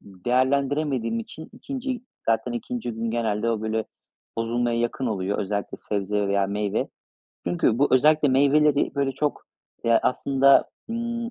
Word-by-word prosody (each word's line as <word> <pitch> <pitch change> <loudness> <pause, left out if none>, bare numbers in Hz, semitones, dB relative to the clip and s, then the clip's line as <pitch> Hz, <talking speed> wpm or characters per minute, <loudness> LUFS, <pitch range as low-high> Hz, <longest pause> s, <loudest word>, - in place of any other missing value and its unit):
değerlendiremediğim 130 +4 0
için 160 +8 -10
2'nci, 265 -2 -5 0.3
zaten 115 +2 +1
2'nci 120 0 -4
gün 115 0 -3
genelde 115 -1 0
o, 110 -2 -1
böyle, 110 0 -1 0.5
bozulmaya 115 +1 0
yakın 120 +2 -1
oluyor. 100 -2 -1
Özellikle 100 0 -3
sebze 100 0 -1
veya 100 0 +2
meyve. 100 0 -1 0.6
Çünkü 90 +7 +1
bu 145 - +4
özellikle 150 +2 +4
meyveleri 145 +2 +3
böyle 140 -1 0
çok, 150 +1 -2 0.4
ya, 115 -1 +4
aslında, 135 +1 +3 0.2
ımm, 235 0 -3
120 Hz, 135 wpm, -24 LUFS, 110-140 Hz, 0.6 s, bu